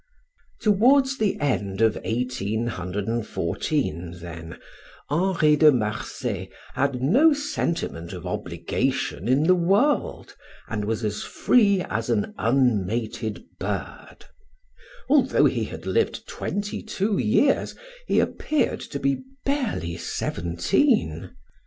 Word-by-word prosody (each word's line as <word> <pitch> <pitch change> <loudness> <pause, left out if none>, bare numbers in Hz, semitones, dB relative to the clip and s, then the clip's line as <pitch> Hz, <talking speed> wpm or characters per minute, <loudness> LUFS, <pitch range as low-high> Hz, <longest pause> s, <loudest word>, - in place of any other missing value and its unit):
Towards 265 +6 +4
the 210 -3 +1
end 100 -9 -1
of 110 -1 +4
1814, 110 - -2
then, 80 -1 -8 0.5
Henri 165 -2 +3
de 150 0 +7
Marsay 105 -3 -3 0.2
had 130 -2 0
no 275 - +5
sentiment 170 - -3
of 90 -2 -8
obligation 90 +2 -2
in 130 +4 +3
the 180 +3 +5
world, 195 - +1 0.3
and 105 -2 -3
was 110 +1 -2
as 105 -1 -2
free 200 -6 +3
as 115 +2 -3
an 110 -4 0
unmated 115 -2 0 0.2
bird. - - -5 0.8
Although 270 -1 +4
he - - +1
had - - -8
lived 455 - 0
twenty 205 0 -4
two 210 -1 -1
years 270 +6 +2 0.3
he - - +3
appeared 310 - 0
to - - -6
be 275 -1 0 0.2
barely 235 - -1
seventeen. 85 - 0
125 Hz, 105 wpm, -24 LUFS, -, 0.8 s, de